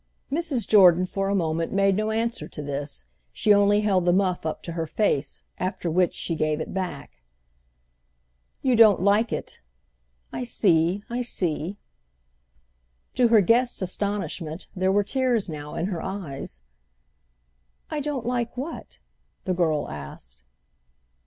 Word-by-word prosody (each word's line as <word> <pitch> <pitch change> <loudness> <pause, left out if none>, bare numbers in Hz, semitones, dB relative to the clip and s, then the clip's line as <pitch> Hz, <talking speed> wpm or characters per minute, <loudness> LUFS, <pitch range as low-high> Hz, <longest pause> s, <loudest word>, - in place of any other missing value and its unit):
Mrs. 295 -6 -1
Jordan 185 -4 +6
for 195 +1 -2
a 200 - +1
moment 165 -2 -1
made 195 0 +3
no 215 +2 0
answer 230 +2 -1
to 150 - -8
this; 140 - -4 0.3
she 210 - +3
only 205 +1 +4
held 195 -4 +2
the 175 - +4
muff 180 -3 +1
up 155 - -4
to 170 - -6
her 165 -1 -3
face, 150 -6 -1 0.2
after 180 -2 -2
which 180 +1 +2
she 170 - -2
gave 155 -1 0
it - - -5
back. 185 - -5 1.4
"You 260 -3 +3
don't 215 -5 +6
like 210 +3 +3
it. - - -5 0.7
I - - -3
see, 185 -4 +2
I 240 +1 -2
see." 180 -5 -2 1.4
To 245 -1 +4
her 225 -2 +6
guest's 240 +6 +2
astonishment 185 -3 -3
there 185 0 +1
were 205 +1 +3
tears 245 -2 0
now 150 -2 -7
in 170 - -1
her 180 -4 -3
eyes. 140 - -6 1.3
"I 305 - -1
don't 290 -4 -3
like 240 0 -2
what?" 285 +6 -6 0.5
the 185 - -1
girl 160 -4 0
asked. 65 -4 -9
190 Hz, 145 wpm, -25 LUFS, 165-220 Hz, 1.4 s, Jordan